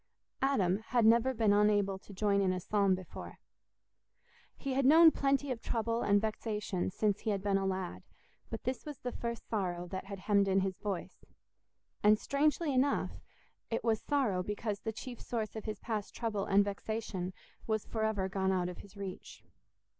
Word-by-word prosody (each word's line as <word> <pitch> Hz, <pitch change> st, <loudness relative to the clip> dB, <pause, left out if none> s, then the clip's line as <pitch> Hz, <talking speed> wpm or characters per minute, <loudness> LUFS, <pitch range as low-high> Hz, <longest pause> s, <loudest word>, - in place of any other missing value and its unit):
Adam 205 Hz, -9 st, +2 dB
had 240 Hz, -3 st, +3 dB
never 235 Hz, +3 st, +5 dB
been 220 Hz, -4 st, +3 dB
unable 205 Hz, -2 st, +3 dB
to 205 Hz, -, -15 dB
join 200 Hz, 0 st, +2 dB
in 190 Hz, -1 st, +2 dB
a 185 Hz, -, -1 dB
psalm 200 Hz, 0 st, +2 dB
before. 185 Hz, -2 st, -9 dB, 1.2 s
He 275 Hz, -2 st, -3 dB
had 270 Hz, +1 st, +2 dB
known 320 Hz, +4 st, +8 dB
plenty 275 Hz, -1 st, +1 dB
of 235 Hz, -3 st, -3 dB
trouble 230 Hz, 0 st, -1 dB
and 205 Hz, 0 st, +4 dB
vexation 210 Hz, -3 st, -2 dB
since 205 Hz, +1 st, 0 dB
he 225 Hz, -, -3 dB
had 200 Hz, -2 st, -1 dB
been 200 Hz, -1 st, +2 dB
a 195 Hz, -, -1 dB
lad, 190 Hz, -1 st, -3 dB, 0.5 s
but -, -, -5 dB
this 255 Hz, 0 st, -2 dB
was 295 Hz, -3 st, -7 dB
the 245 Hz, -, -4 dB
first 235 Hz, -1 st, -5 dB
sorrow 180 Hz, -5 st, -2 dB
that 190 Hz, +1 st, -5 dB
had 195 Hz, -1 st, -7 dB
hemmed 200 Hz, 0 st, +3 dB
in 195 Hz, 0 st, +3 dB
his 190 Hz, -1 st, -2 dB
voice, 200 Hz, -4 st, -5 dB, 0.8 s
and 210 Hz, +1 st, +6 dB
strangely 295 Hz, +4 st, +1 dB
enough 270 Hz, +2 st, +2 dB, 0.6 s
it -, -, -1 dB
was 225 Hz, -2 st, +1 dB
sorrow 255 Hz, -11 st, +1 dB
because 210 Hz, +1 st, -3 dB
the 220 Hz, -, -3 dB
chief 240 Hz, +2 st, -8 dB
source 225 Hz, -3 st, -3 dB
of 220 Hz, -, -6 dB
his 215 Hz, -1 st, -3 dB
past 215 Hz, -2 st, -4 dB
trouble 215 Hz, -4 st, -2 dB
and 200 Hz, +1 st, +4 dB
vexation 200 Hz, -2 st, -3 dB, 0.4 s
was 220 Hz, -1 st, 0 dB
for 220 Hz, -1 st, -3 dB
ever 210 Hz, -3 st, 0 dB
gone 190 Hz, 0 st, 0 dB
out 180 Hz, -1 st, 0 dB
of 180 Hz, -, -8 dB
his 200 Hz, 0 st, -13 dB
reach. 195 Hz, -2 st, -7 dB
210 Hz, 185 wpm, -33 LUFS, 195-235 Hz, 1.2 s, known